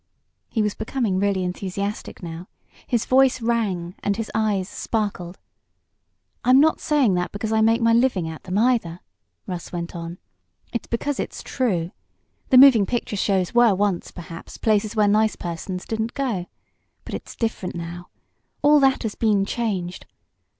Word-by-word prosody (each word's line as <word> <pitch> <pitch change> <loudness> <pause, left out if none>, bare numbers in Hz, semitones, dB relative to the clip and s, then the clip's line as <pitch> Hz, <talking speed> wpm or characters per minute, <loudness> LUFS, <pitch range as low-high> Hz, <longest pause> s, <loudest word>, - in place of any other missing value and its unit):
He 220 - 0
was 210 -1 0
becoming 220 -4 -1
really 195 -2 +1
enthusiastic 195 +3 -4
now. 170 +2 -7 0.4
His 235 -3 0
voice 260 0 +4
rang, 210 -7 -1
and 205 0 0
his 225 -1 -4
eyes 210 -4 0
sparkled. 200 -6 -3 1.1
"I'm 255 +2 +6
not 315 +2 +4
saying 285 -9 +2
that 180 0 -1
because 215 +2 -4
I 220 0 +3
make 225 +2 +3
my 230 0 +4
living 230 -8 +2
at 160 -1 -7
them, 185 +1 -2
either," 220 -8 +1 0.4
Russ 180 -3 -6
went 170 0 -5
on. 170 +1 -6 0.6
"It's 235 - -3
because 270 +4 -2
it's - - -4
true. 185 -10 -1 0.6
The 260 - +6
moving 250 -7 +8
picture 240 -3 -2
shows 190 -3 0
were 240 -4 +5
once, 195 -2 0
perhaps, 165 -1 -10
places 215 0 +1
where 210 -1 +4
nice 215 +1 +3
persons 180 +2 -5
didn't 220 +1 -3
go. 230 -11 -2 0.6
But - - -8
it's - - -7
different 225 -6 -3
now. 170 +1 -6 0.6
All 295 +1 +6
that 270 -2 +3
has 220 -2 -2
been 210 -3 +2
changed. 195 -6 -3
210 Hz, 155 wpm, -23 LUFS, 180-235 Hz, 1.1 s, moving